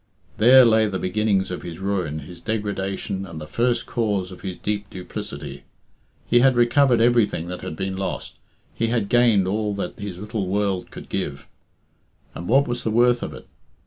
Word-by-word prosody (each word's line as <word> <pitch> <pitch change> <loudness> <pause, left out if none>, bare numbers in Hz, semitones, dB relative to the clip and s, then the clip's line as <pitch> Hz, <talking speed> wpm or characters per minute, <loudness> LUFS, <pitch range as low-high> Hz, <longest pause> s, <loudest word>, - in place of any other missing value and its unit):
There 125 +4 +8
lay 110 -1 +4
the 95 -2 -2
beginnings 100 0 0
of 90 - -4
his 85 -2 -7
ruin, 90 -6 -2
his 85 +4 -11
degradation, 100 -2 -3
and 85 -4 -8
the 75 - -7
first 120 +8 0
cause 100 -6 -1
of 90 - -11
his 95 -2 -5
deep 105 -1 -3
duplicity. 70 -6 -7 0.6
He 120 - +4
had 130 +1 +5
recovered 120 +1 +4
everything 115 -7 +2
that 90 - -6
had - - -5
been 95 +2 -3
lost; 95 0 -5 0.3
he 115 - -1
had 115 -4 0
gained 115 -6 +4
all 105 +1 -1
that 100 - -5
his 100 -3 -6
little 105 0 -4
world 100 -1 -1
could - - -10
give; 70 -1 -4 0.9
and 85 - -7
what 135 +4 +4
was 120 0 -3
the - - 0
worth 120 +2 +3
of - - -4
it? - - -12
100 Hz, 180 wpm, -23 LUFS, 90-115 Hz, 0.9 s, There